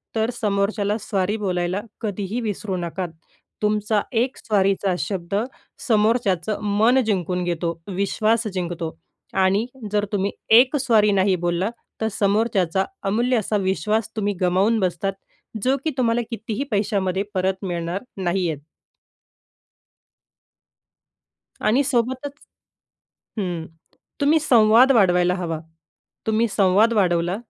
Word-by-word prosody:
तर 220 Hz, +1 st, +1 dB
समोरच्याला 205 Hz, 0 st, 0 dB
सॉरी 205 Hz, +1 st, -1 dB
बोलायला 185 Hz, -1 st, -1 dB, 0.2 s
कधीही 205 Hz, +1 st, -3 dB
विसरू 210 Hz, -3 st, -3 dB
नका. 175 Hz, +1 st, -3 dB, 0.6 s
तुमचा 210 Hz, 0 st, +1 dB, 0.2 s
एक 250 Hz, +3 st, -1 dB
सॉरीचा 195 Hz, -2 st, +1 dB
शब्द 190 Hz, -1 st, -3 dB, 0.5 s
समोरच्याचं 215 Hz, -3 st, +1 dB, 0.2 s
मन 240 Hz, +5 st, +5 dB
जिंकून 180 Hz, -4 st, -1 dB
घेतो, 170 Hz, -1 st, -2 dB
विश्वास 215 Hz, +3 st, +1 dB
जिंकतो. 170 Hz, -3 st, -4 dB, 0.4 s
आणि 195 Hz, +3 st, +2 dB, 0.3 s
जर 210 Hz, 0 st, +1 dB
तुम्ही 200 Hz, 0 st, 0 dB, 0.3 s
एक 260 Hz, +4 st, +3 dB
सॉरी 220 Hz, -6 st, +3 dB
नाही 190 Hz, -1 st, +3 dB
बोललात, 175 Hz, +5 st, 0 dB, 0.3 s
तर 220 Hz, -, +1 dB
समोरच्याचा 200 Hz, -3 st, +1 dB, 0.2 s
अमूल्य 240 Hz, +5 st, +2 dB
असा 215 Hz, 0 st, 0 dB
विश्वास 210 Hz, +3 st, 0 dB
तुम्ही 205 Hz, -2 st, 0 dB
गमावून 190 Hz, +5 st, +2 dB
बसतात, 185 Hz, +1 st, -1 dB, 0.5 s
जो 265 Hz, +2 st, +2 dB
की 315 Hz, -, +1 dB
तुम्हाला 240 Hz, -1 st, +2 dB
कितीही 225 Hz, +2 st, -3 dB
पैशामध्ये 195 Hz, -2 st, 0 dB
परत 190 Hz, +1 st, -1 dB
मिळणार 175 Hz, +1 st, -3 dB, 0.2 s
नाही 180 Hz, 0 st, 0 dB
आहेत. 145 Hz, -2 st, -4 dB, 3.0 s
आणि 245 Hz, +6 st, +3 dB
सोबतच 260 Hz, +2 st, -1 dB, 1.1 s
हं, 175 Hz, -5 st, -3 dB, 0.5 s
तुम्ही 295 Hz, +3 st, +4 dB
संवाद 240 Hz, -1 st, +6 dB
वाढवायला 180 Hz, -5 st, +4 dB
हवा. 165 Hz, -4 st, -3 dB, 0.7 s
तुम्ही 220 Hz, +1 st, +2 dB
संवाद 200 Hz, +3 st, +3 dB
वाढवला 175 Hz, -2 st, +2 dB
200 Hz, 110 wpm, -22 LUFS, 185-220 Hz, 3.0 s, संवाद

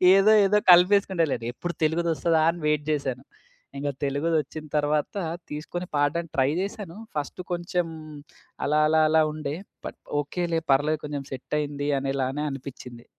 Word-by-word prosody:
ఏదో 200 Hz, +3 st, +6 dB
ఏదో 210 Hz, +2 st, +4 dB
కలిపేసుకుంటలెండి. 180 Hz, -, +4 dB
ఎప్పుడు 175 Hz, -1 st, -4 dB
తెలుగు‌దొస్తదా 165 Hz, 0 st, +1 dB
అని 175 Hz, -, -9 dB
వెయిట్ 150 Hz, -1 st, +1 dB
జేశాను. 135 Hz, -3 st, -2 dB, 0.5 s
ఇంక 145 Hz, +1 st, -3 dB, 0.2 s
తెలుగుదొచ్చిన 155 Hz, +1 st, -1 dB
తర్వాత 150 Hz, +4 st, 0 dB, 0.3 s
తీసుకొని 170 Hz, +4 st, -5 dB
పాడడానికి 150 Hz, +3 st, 0 dB
ట్రై 135 Hz, +1 st, +4 dB
చేశాను. 195 Hz, -2 st, -6 dB, 0.2 s
ఫస్ట్ 150 Hz, +5 st, -4 dB
కొంచెం 175 Hz, 0 st, -1 dB, 0.8 s
అలా 150 Hz, +1 st, +2 dB
అలా 160 Hz, 0 st, +4 dB
అలా 160 Hz, 0 st, +5 dB
ఉండే. 150 Hz, -1 st, -4 dB, 0.3 s
బట్ -, -, -7 dB, 0.2 s
ఓకేలే 165 Hz, +3 st, -1 dB
పర్లేదు 150 Hz, +3 st, +2 dB
కొంచెం 145 Hz, -2 st, -4 dB
సెట్టయింది 145 Hz, +2 st, -3 dB
అనేలానే 135 Hz, +1 st, -2 dB
అనిపిచింది. 125 Hz, -3 st, -9 dB
150 Hz, 125 wpm, -26 LUFS, 145-170 Hz, 0.8 s, ఏదో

